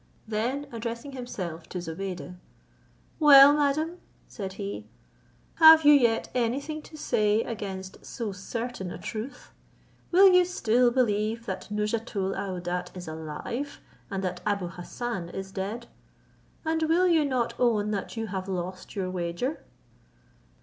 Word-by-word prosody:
Then 240 +7 -1
addressing 235 +3 -5
himself 185 -11 -6
to - - -5
Zobeide, 180 +2 -5 0.9
"Well, 285 -2 +9
madam," 300 +4 0 0.3
said 195 -3 -6
he, 200 0 -6 0.7
"have 320 -1 +9
you 295 - +9
yet 235 -5 +3
any 245 +1 +1
thing 305 +2 -6
to 310 - -13
say 215 -5 +1
against 195 -4 -6
so 230 -5 -5
certain 200 +1 -5
a - - -6
truth? 225 +5 -7 0.6
Will 380 +3 +7
you 360 0 +7
still 250 -9 +2
believe 230 -2 0
that 190 -1 -5
Nouzhatoul 210 -2 -2
aouadat 180 -1 -4
is 180 -1 -8
alive, 160 - -5 0.3
and 195 -1 -3
that 180 -1 -3
Abou 200 -4 -1
Hassan 185 +1 -5
is 190 +1 -6
dead? 205 +5 -4 0.8
And 320 0 0
will 355 +3 +4
you 330 -3 +4
not 255 -4 0
own 215 -4 +2
that 205 +2 -4
you 225 - -2
have 190 -2 -4
lost 185 0 -5
your 185 -2 -2
wager?" 180 - -3
220 Hz, 135 wpm, -27 LUFS, 190-260 Hz, 0.9 s, Well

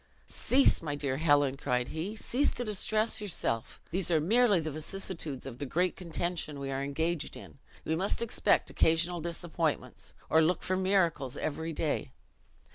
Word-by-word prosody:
"Cease, 270 +2 +3
my 150 -3 -3
dear 140 -2 -2
Helen," 145 -3 +3
cried 125 -3 -1
he, 180 +7 -4
"cease 255 +5 +1
to 245 - -2
distress 215 +1 0
yourself! 115 - -1
These 180 0 0
are 165 -2 +4
merely 210 +4 +4
the 155 -1 -3
vicissitudes 155 -2 -4
of 125 -2 -8
the 145 - -3
great 180 +6 +1
contention 170 -3 -3
we 135 0 -4
are 135 0 -2
engaged 160 +4 -2
in. 80 -8 -13 0.3
We 160 - 0
must 190 +5 -1
expect 235 -1 +2
occasional 165 +2 +2
disappointments, 170 -1 -3
or 160 - +5
look 170 +3 +1
for 185 - 0
miracles 180 -8 +1
every 160 +2 -3
day. 145 -4 -2
160 Hz, 160 wpm, -30 LUFS, 145-185 Hz, 0.3 s, or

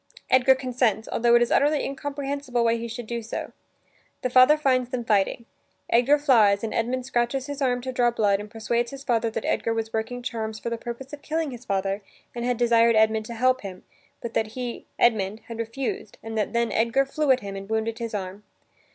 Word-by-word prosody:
Edgar 260 +1 +6
consents, 245 -5 0
altho 235 0 +3
it 240 - +6
is 240 - -3
utterly 295 +1 +3
incomprehensible 280 -3 -3
why 230 0 +3
he 235 0 -4
should 230 +1 -6
do 235 +1 -4
so. 225 - -5 0.7
The 255 - -1
father 255 +4 +7
finds 255 -4 +1
them 250 -2 -3
fighting. 210 +2 +1 0.5
Edgar 250 +5 +5
flies 225 -9 +4
and 220 - -3
Edmund 245 +2 -1
scratches 245 +2 0
his 285 0 -6
arm 250 -2 +1
to 260 +1 -4
draw 245 -1 +2
blood 205 -4 +1
and 210 +1 -8
persuades 235 +2 -1
his 275 +1 -9
father 230 -3 +1
that - - -4
Edgar 230 - 0
was 225 0 -3
working 225 +3 -3
charms 220 -2 -4
for 235 - -5
the - - 0
purpose 250 +4 -7
of 290 - -8
killing 315 -2 -2
his 245 0 -10
father 195 +1 -1 0.3
and 240 - -4
had 245 0 0
desired 235 -1 +4
Edmund 220 0 +3
to 235 - -6
help 255 +2 +2
him, 190 -2 -8 0.4
but 235 -1 -6
that 220 - +1
he, 245 -2 -5
Edmund, 215 -2 +2
had 230 -1 -9
refused 230 -1 -4
and 225 0 -6
that 215 -1 -1
then 235 0 0
Edgar 235 +5 +2
flew 295 +2 -2
at 260 -1 +4
him 200 -1 -6
and 195 +1 -8
wounded 220 +1 -1
his 230 -2 -4
arm. 190 0 -5
235 Hz, 210 wpm, -25 LUFS, 220-255 Hz, 0.7 s, father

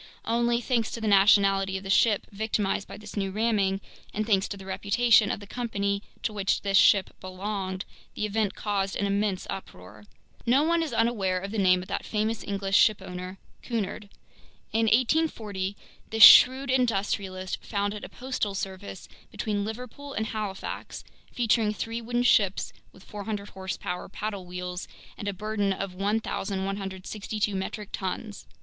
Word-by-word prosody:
Only, 235 +1 +1
thanks 235 -2 0
to - - -4
the 220 - -2
nationality 195 -1 +4
of 190 - -8
the 195 - -3
ship 210 +1 +3
victimized 205 -1 -1
by - - -9
this 210 0 -10
new 195 -2 -1
ramming, 200 -2 +1 0.3
and 215 +1 0
thanks 200 -3 +2
to 200 - -6
the 190 - -11
reputation 205 +3 +3
of - - -2
the 205 - -10
company 200 -3 -2 0.2
to 215 - -1
which 200 -2 0
this 195 -1 0
ship 195 -2 +5
belonged, 190 0 -4 0.3
the 215 - -1
event 210 -1 -1
caused 195 -2 -1
an 200 - 0
immense 200 -1 0
uproar. 105 - -9 0.4
No 260 +5 +4
one 335 +1 +2
is 320 - -2
unaware 210 -5 +1
of 195 +2 -6
the 220 - -2
name 185 -1 +4
of - - -13
that - - -2
famous 215 +1 -1
English 195 -1 -1
shipowner, 185 -2 +1 0.2
Cunard. 210 -3 -3 0.6
In 225 0 +2
1840 220 -6 +1 0.3
this 220 0 +5
shrewd 260 +1 +9
industrialist 195 -6 -1
founded 205 0 -2
a - - -7
postal 250 -6 -3
service 190 0 -6 0.2
between 205 -2 -2
Liverpool 250 +6 -7
and 220 - -1
Halifax, 210 -3 -5 0.3
featuring 225 -3 +1
three 230 +2 -4
wooden 240 +1 -1
ships 200 -5 +3 0.2
with 190 - -17
400 205 0 -5
horsepower 190 -1 -5
paddle 200 -2 -5
wheels 180 0 -5 0.3
and 205 - -7
a - - +1
burden 205 +1 -1
of 195 -1 -3
1,162 195 0 -2
metric 195 +2 -4
tons. 205 +2 -5
205 Hz, 155 wpm, -27 LUFS, 195-220 Hz, 0.6 s, shrewd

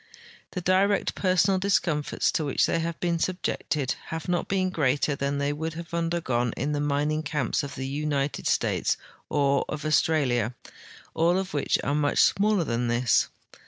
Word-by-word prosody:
The 180 - -3
direct 190 +3 +2
personal 185 0 +2
discomforts 175 -6 +1
to 160 - -1
which 140 -3 +1
theyvhave 165 0 -1
been 170 -1 0
subjected 155 -6 -1
have 165 -1 -5
not 175 -1 0
been 185 -1 0
greater 145 -2 +1
than 140 +1 -1
the}" 140 +1 0
would 160 +2 -4
have 170 0 -8
undergone 165 -9 0
in 145 +4 -1
the 145 - -1
mining 145 +1 0
camps 150 -3 -1
of 140 -2 -6
the 135 +3 -3
IJnited 145 -1 -1
States - - +1 0.3
or 140 -1 +2
of 150 0 -4
Australia, 130 -7 +2 0.6
all 170 +3 +2
of 190 0 -3
Avhich 145 - +1
are 140 - 0
much 145 -1 +1
smaller 205 -2 +3
than 120 -4 -1
this. 120 -1 +2
150 Hz, 160 wpm, -26 LUFS, 140-170 Hz, 0.6 s, smaller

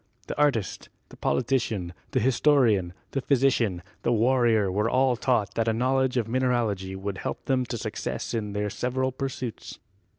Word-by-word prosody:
The - - -5
artist, 115 - 0 0.2
the - - -13
politician, 115 -8 0 0.2
the - - +1
historian, 120 -7 +3 0.2
the 135 - -1
physician, 120 -10 +2 0.2
the 120 - +1
warrior 115 -3 +3
were 105 +4 +1
all 130 0 +3
taught 115 -5 0
that 115 0 0
a 115 - +3
knowledge 130 +2 +1
of 115 -3 0
mineralogy 115 -6 0
would 95 0 -4
help - - -5
them 130 -2 +1
to - - -3
success - - -4
in 105 -3 -2
their 105 0 -1
several 130 +1 -1
pursuits. 130 -3 -5
120 Hz, 160 wpm, -26 LUFS, 105-130 Hz, 0.2 s, historian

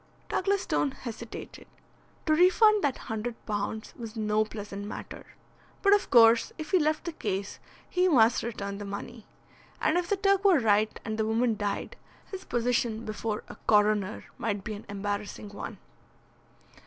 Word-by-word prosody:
Douglas 395 +1 +1
Stone 290 - +1
hesitated. 235 -3 -8 0.6
To 310 - +3
refund 390 +5 +5
that 280 -3 +1
hundred 225 +2 -4
pounds 210 +1 -3
was 230 -2 -8
no 215 -1 +1
pleasant 205 -2 -7
matter. - - -8 0.6
But 400 0 +6
of 410 -1 +2
course 230 -1 +6
if 310 -1 -7
he 375 - +5
left 310 0 +1
the 340 - -2
case 200 -9 -4 0.3
he 365 0 +2
must 235 -8 +5
return 200 -3 -5
the - - -5
money. 200 +3 -7 0.5
And 335 +3 +2
if 350 - -3
the 405 - +2
Turk 395 0 +3
were 385 -4 +6
right 215 -3 +2
and 220 0 -3
the 220 - +2
woman 225 +1 +2
died, 205 -1 -3 0.3
his 375 -1 -7
position 235 -1 0
before 215 0 -3
a - - -10
coroner 210 -1 +3 0.2
might 205 -3 -2
be 215 - -4
an 205 - -9
embarrassing 205 +1 -4
one. 200 - -7
225 Hz, 160 wpm, -28 LUFS, 210-310 Hz, 0.6 s, But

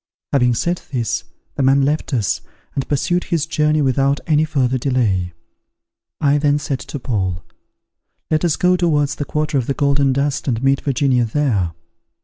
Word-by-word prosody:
Having 125 -3 +3
said 175 +8 -1
this, 120 -5 -2 0.3
the - - -3
man 135 +1 +4
left 150 +3 0
us, 115 -7 0 0.3
and 135 - -3
pursued 175 +5 0
his 165 -4 0
journey 150 -2 +1
without 135 +1 +2
any 155 -1 +3
further 130 -4 0
delay. 110 -9 0 0.9
I 145 0 +3
then 145 0 +2
said 140 -3 -3
to - - -6
Paul, 95 -9 -2 0.9
"Let 155 +1 +2
us 170 -3 +2
go 180 0 +3
towards 150 -5 +1
the 145 - -3
quarter 150 -1 -1
of 120 - -3
the 140 - -1
Golden 140 -1 +2
Dust, 140 +2 -1
and 120 -1 -1
meet 135 0 +2
Virginia 130 -3 +1
there. 110 - 0
140 Hz, 165 wpm, -19 LUFS, 125-150 Hz, 0.9 s, man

